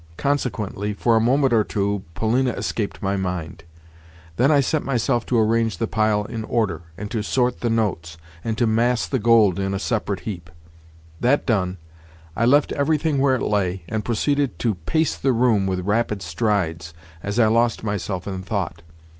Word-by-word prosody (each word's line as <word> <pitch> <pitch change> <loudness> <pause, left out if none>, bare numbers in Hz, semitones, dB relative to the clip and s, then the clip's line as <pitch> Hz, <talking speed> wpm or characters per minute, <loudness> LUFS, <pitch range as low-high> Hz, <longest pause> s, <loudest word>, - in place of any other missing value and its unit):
Consequently, 110 -7 -1
for 115 +2 +2
a 110 - +4
moment 130 +2 +3
or 110 -2 +4
two 100 -1 -1
Polina 125 +3 +1
escaped 105 -3 -3
my 100 0 0
mind. 90 -4 -4 0.7
Then 125 +9 +3
I 150 -2 +5
set 145 +3 0
myself 120 -2 0
to 125 - +1
arrange 115 0 +2
the 115 - 0
pile 110 -1 +1
in 110 +1 -5
order, 105 -11 -1 0.2
and 105 +2 -6
to 115 -3 -1
sort 125 +3 0
the 120 - -1
notes, 95 -8 -1 0.3
and 110 -1 -2
to 120 - +2
mass 115 +2 +2
the 130 - -1
gold 110 -4 +4
in 95 0 -1
a - - 0
separate 105 -2 -2
heap. 90 -6 -6 0.7
That 130 +4 +2
done, 95 -6 0 0.6
I 115 - +1
left 145 +3 +4
everything 150 0 +1
where 135 -1 +3
it 130 - -2
lay, 95 -3 0
and 110 -1 -2
proceeded 135 - 0
to 115 +2 0
pace 160 - -1
the 135 -1 +1
room 115 -5 +2
with 95 -1 -1
rapid 105 -1 0
strides 85 -3 -1 0.3
as 100 +2 -4
I 120 - +5
lost 115 +1 +2
myself 100 -3 -3
in 95 -2 -4
thought. 90 -4 -3
110 Hz, 180 wpm, -22 LUFS, 100-120 Hz, 0.7 s, I